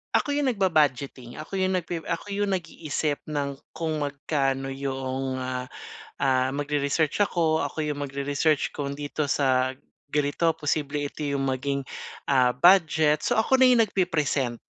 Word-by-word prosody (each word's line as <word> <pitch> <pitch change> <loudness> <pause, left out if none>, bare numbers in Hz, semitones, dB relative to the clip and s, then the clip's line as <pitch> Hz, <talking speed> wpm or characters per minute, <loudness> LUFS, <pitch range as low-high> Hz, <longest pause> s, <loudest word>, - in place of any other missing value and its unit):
Ako 290 - +2
'yong 285 -1 +1
nag-ba-budgeting, 145 - +1
ako 190 +5 -5
'yong 185 0 +1
nagpre 175 -1 -2
ako 185 +5 -3
'yong 205 0 0
nag-iisip 155 -3 -3
ng 140 -2 -3 0.2
kung 160 -2 -2
magkano 135 -2 -1
'yong, 135 -1 -3
ah, 130 0 -3 0.5
ah, 130 -1 +2
mag-re-research 145 +5 0
ako, 160 -5 +1
ako 145 +2 -5
'yong 145 -1 -3
mag-re-research 140 +2 0
kung 140 0 -4
dito 145 0 -2
sa 130 -1 +1 0.3
ganito 150 +3 +1
posible 145 -1 -1
ito 150 - -7
'yong 140 -1 -1
maging, 140 +1 -1 0.5
ah, 130 -3 +4
budget, 155 0 +4
so - - +1
ako 260 +4 +3
na 255 - +8
'yong 240 -2 +6
nag-pi-present. 150 - 0
145 Hz, 145 wpm, -26 LUFS, 135-165 Hz, 0.5 s, na